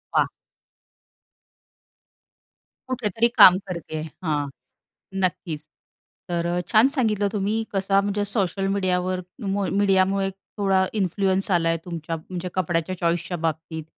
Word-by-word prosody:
वाह! - - +3 2.6
कुठेतरी 230 -3 +1
काम 185 0 +10
करते 170 -3 -5
आहे, 155 +1 -4 0.2
हां. 150 -3 0 0.8
नक्कीच. 170 -4 -2 0.7
तर 170 -1 -1
अ, 175 +1 0
छान 225 +3 +6
सांगितलं 215 -6 +1
तुम्ही 210 +2 0
कसा 195 0 +2
म्हणजे 205 +1 -1
सोशल 195 -2 0
मीडियावर 185 -1 0 0.3
मु 195 0 0
मीडियामुळे 195 0 +3 0.3
थोडा 195 -2 +3
इन्फ्लुअन्स 190 +1 0
आलाय 165 -2 +2
तुमच्या 165 -2 -4
म्हणजे 180 +3 -6
कपड्याच्या 175 0 0
चॉईसच्या 170 +1 -1
बाबतीत 160 0 -3
185 Hz, 110 wpm, -24 LUFS, 170-200 Hz, 2.6 s, काम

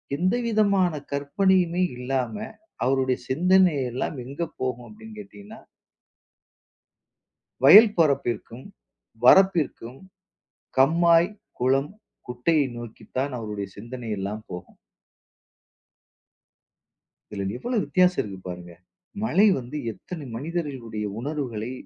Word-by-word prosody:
எந்த 185 +7 +1
விதமான 200 -5 +2 0.2
கற்பனையுமே 180 +5 +1
இல்லாம, 130 - -2 0.5
அவருடைய 130 -1 +1
சிந்தனை 180 +4 +3 0.2
எல்லாம் 130 +3 -3
எங்க 140 +6 -7 0.2
போகும் 125 -1 -3
அப்படின்னு 220 0 -13
கேட்டீங்கன்னா 205 +2 -12 2.1
வயல் 215 0 +9
பரப்பிற்கும், 125 -5 0 0.6
வரப்பிற்கும், 155 -8 +3 0.8
கம்மாய், 170 +5 +4 0.3
குளம், 135 +5 +1 0.4
குட்டையை 140 +5 +1
நோக்கித்தான் 120 +4 -5
அவருடைய 105 -3 -5
சிந்தனை 115 +1 -8
எல்லாம் 105 +3 -5
போகும். 90 0 -9 2.5
இதுல 100 -2 -4
எவ்வளவு 240 - -1
வித்தியாசம் 180 0 +2
இருக்கு 95 -3 -8
பாருங்க! 90 -1 -8 0.5
"மழை 215 -1 +3
வந்து 125 +4 -7 0.2
எத்தனை 160 - -9
மனிதர்களுடைய 135 -8 -4 0.2
உணர்வுகளை 125 -5 -4
140 Hz, 90 wpm, -24 LUFS, 120-180 Hz, 2.5 s, வயல்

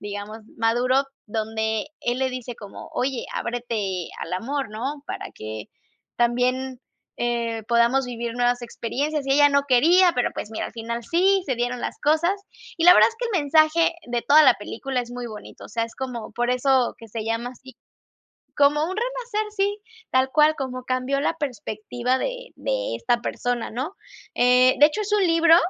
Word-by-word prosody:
digamos, 205 +1 -6 0.2
maduro, 245 +4 +2 0.2
donde 220 +1 -2
él 240 +1 -1
le 265 0 +1
dice 250 -1 -6
como: 205 -2 -10
"Oye, 260 -1 -1
ábrete 220 -7 -3
al 165 - -6
amor 265 +4 -3
¿no? 270 +7 -4
Para - - -6
que 110 0 -7 0.5
también, 250 +2 0 0.4
eh, 235 -2 -1
podamos 235 +3 +3
vivir 235 -1 -4
nuevas 245 0 +1
experiencias", 275 +5 -3
y 270 - +2
ella 290 0 +6
no 280 0 +3
quería, 340 +8 +5
pero, 245 - +1
pues, 210 - -5
mira, - - -3
al - - -10
final 235 +1 -4
sí, 380 +3 +3
se 260 -3 -1
dieron 245 0 -2
las - - -4
cosas. 315 +5 +3 0.4
Y 330 - 0
la 360 - +10
verdad - - +7
es 455 - -16
que 480 +1 -2
el 305 - +1
mensaje 315 +3 +4
de 240 -1 -2
toda 305 +2 +7
la 265 - +7
película 250 +6 -4
es 240 0 -7
muy 245 -1 -5
bonito, 215 -2 -10
o - - -19
sea, 230 +1 -2
es 230 - -11
como 250 -4 -5
por 240 +1 0
eso 250 0 +2
que 225 - -12
se 220 +1 -5
llama 230 +2 -2
así, 260 0 -15 0.8
como 290 +1 +4
un 375 +3 -4
renacer, 465 -3 -2
sí, 405 0 -1 0.3
tal 260 0 +3
cual 310 0 +5
como 255 -2 -4
cambió 255 +2 0
la - - +1
perspectiva 245 -2 -2
de - - -4
de - - -2
esta 240 0 +1
persona 245 -1 -2
¿no? 275 - -4 0.4
Eh, 250 +1 +5
de 295 - +9
hecho, 425 +8 -3
es 415 0 -4
un 410 -2 +3
libro 330 0 +6
255 Hz, 185 wpm, -24 LUFS, 235-300 Hz, 0.8 s, la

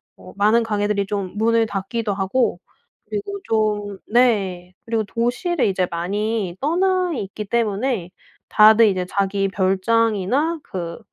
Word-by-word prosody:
어 - - -14
많은 215 +3 +4
가게들이 205 -2 0
좀 195 -2 -4
문을 230 +1 +3
닫기도 205 +2 -3
하고 195 +6 0 0.5
그리고 405 -1 -4
좀 210 - -1
네. 195 -7 +1
그리고 225 -1 0
도시를 245 - -1
이제 185 -2 +1
많이 200 +2 -2
떠나 365 +3 +1
있기 210 -5 -5
때문에 220 -2 -1 0.4
다들 220 +1 +6
이제 185 -2 0
자기 195 0 0
별장이나 225 - +1
그 170 -1 -6
210 Hz, 260 characters per minute, -21 LUFS, 195-235 Hz, 0.5 s, 다들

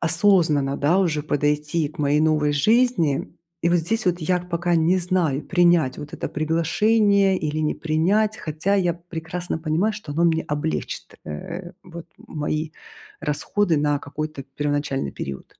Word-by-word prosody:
осознанно, 165 -5 +3
да, 165 +7 +3
уже 160 -6 +1
подойти 150 +2 0
к 155 - -17
моей 145 +1 +2
новой 155 -1 +2
жизни. 190 - +2 0.3
И, 170 - +3
вот, 175 - +3
здесь 215 +5 -2
вот, 175 0 +2
я 180 +3 +1
пока 175 0 -1
не 165 +3 +3
знаю, 175 -6 0
принять, 175 -6 +3
вот, 150 0 -8
это - - -4
приглашение 195 +6 +2
или 155 0 -2
не 155 -1 0
принять, 195 +8 +1
хотя 160 +6 -1
я 175 -3 +1
прекрасно 170 0 -5
понимаю, 165 +7 0
что 210 -9 -7
оно 170 +3 +1
мне 160 -1 +2
облегчит, 145 - -4
э, 170 - -7
вот, 170 -2 -10
мои 155 +1 -4 0.5
расходы 170 +4 0
на 145 -1 +1
какой-то 155 0 -6
первоначальный 145 0 -2
период. 70 -1 -8
160 Hz, 150 wpm, -23 LUFS, 150-180 Hz, 0.5 s, осознанно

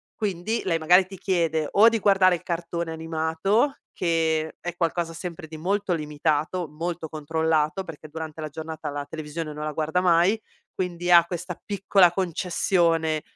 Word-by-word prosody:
quindi 210 +2 -2
lei 170 -3 +1
magari 180 +4 +5
ti 195 0 -11
chiede 165 -5 0
o 220 +3 +6
di 225 -1 -1
guardare 190 -3 +4
il - - -9
cartone 170 -1 -3
animato 160 - 0
che 160 -2 0
è 175 -1 -5
qualcosa 170 -1 -1
sempre 170 0 -7
di 155 0 -9
molto 195 +2 0
limitato, 155 +2 -1
molto 165 +2 -4
controllato, 160 +2 0
perché 155 -2 -10
durante 160 0 -7
la 155 - -3
giornata 160 0 -6
la 145 0 -4
televisione 155 0 -5
non 150 +1 -5
la 155 - -2
guarda 160 +4 0
mai, 180 +5 +3 0.3
quindi 175 -1 -2
ha 170 -1 +9
questa 175 0 -6
piccola 195 -3 +3
concessione, 170 -3 +1
170 Hz, 155 wpm, -25 LUFS, 160-180 Hz, 0.3 s, ha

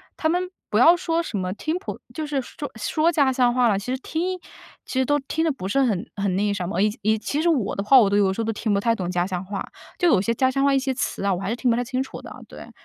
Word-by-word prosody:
他 315 - 0
们 360 +2 0 0.2
不 210 - +1
要 330 +8 +7
说 335 -1 -1
什 225 -10 -4
么 185 -1 -2
听 310 - -2
普 395 - -7
就 315 - -4
是 290 -2 -1
说 290 +3 -8
说 315 +9 +1
家 280 -5 +2
乡 245 -1 +3
话 250 -1 +3
了， 200 -3 +2
其 250 +6 -3
实 - - -1
听 360 +6 -3 0.5
其 - - -5
实 260 - +3
都 290 +2 +2
听 300 +4 -2
得 320 - +2
不 190 -8 -6
是 275 +7 +2
很 215 -2 -1
很 200 -2 -1
那 205 - +1
个 205 - +1
什 180 -3 -3
么， 190 0 -1
以 210 0 +1
以 220 +2 +2
其 285 +7 -2
实 340 - +2
我 250 -11 0
的 200 - -2
话 260 +5 +7
我 205 -4 +4
都 200 - +1
有 200 -2 +3
时 195 - -5
候 225 - 0
都 225 - -1
听 210 0 -1
不 200 - +2
太 230 +2 +1
懂 180 -3 -3
家 180 0 0
乡 180 -1 -3
话， 195 +1 -5 0.3
就 355 - +3
有 200 - +4
些 230 +3 0
家 260 +2 +2
乡 275 +1 0
话 280 0 +4
一 270 - +3
些 265 0 -1
词 245 - -3
啊， 195 - +2
我 180 - -3
还 195 - -3
是 235 - -2
听 250 - +1
不 230 - +3
太 245 - 0
清 255 +1 -2
楚 265 - -7
的， - - -10
对。 - - -11
245 Hz, 340 characters per minute, -23 LUFS, 200-290 Hz, 0.5 s, 要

